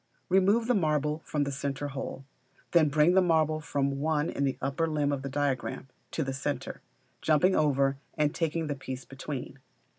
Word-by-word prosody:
Remove 195 +5 +4
the 250 - +2
marble 150 - +1
from 150 -1 0
the 140 - -2
centre 140 +1 -3
hole; 135 0 -6 0.5
then 160 -3 +5
bring 150 +4 +4
the 190 - +6
marble 160 -3 +2
from 140 -2 -1
1 155 +1 +1
in 140 - 0
the 135 - -1
upper 140 +5 0
limb 150 -2 0
of 140 -2 -1
the 140 - -4
diagram, 135 -1 -2 0.2
to 160 - -2
the 135 -1 -3
centre, 140 +2 -4 0.4
jumping 160 +5 +3
over 140 -2 +2 0.2
and 150 -1 +2
taking 165 -1 -1
the 150 - -1
piece 130 -2 -7
between. 135 0 -6
145 Hz, 180 wpm, -29 LUFS, 140-160 Hz, 0.5 s, the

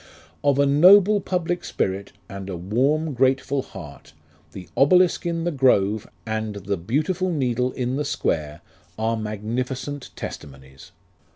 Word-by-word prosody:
Of 140 -1 +3
a 140 - +4
noble 190 +8 +6
public 175 -1 -2
spirit 95 +1 -2 0.2
And 100 0 -7
A 90 - -4
warm 135 - 0
grateful 135 +2 +1
heart 80 - -12 0.4
The 90 - -10
obelisk 180 +5 +4
in 165 -1 -2
the 175 - 0
grove, 110 -7 +2 0.2
And 110 -1 -3
The 100 0 -3
beautiful 155 - -1
needle 125 -4 0
in 125 +1 -2
the 150 - -2
square, 75 - -2 0.4
Are 110 +1 0
magnificent 125 +6 -4
testimonies. 65 -1 -10
125 Hz, 130 wpm, -23 LUFS, 100-150 Hz, 0.4 s, noble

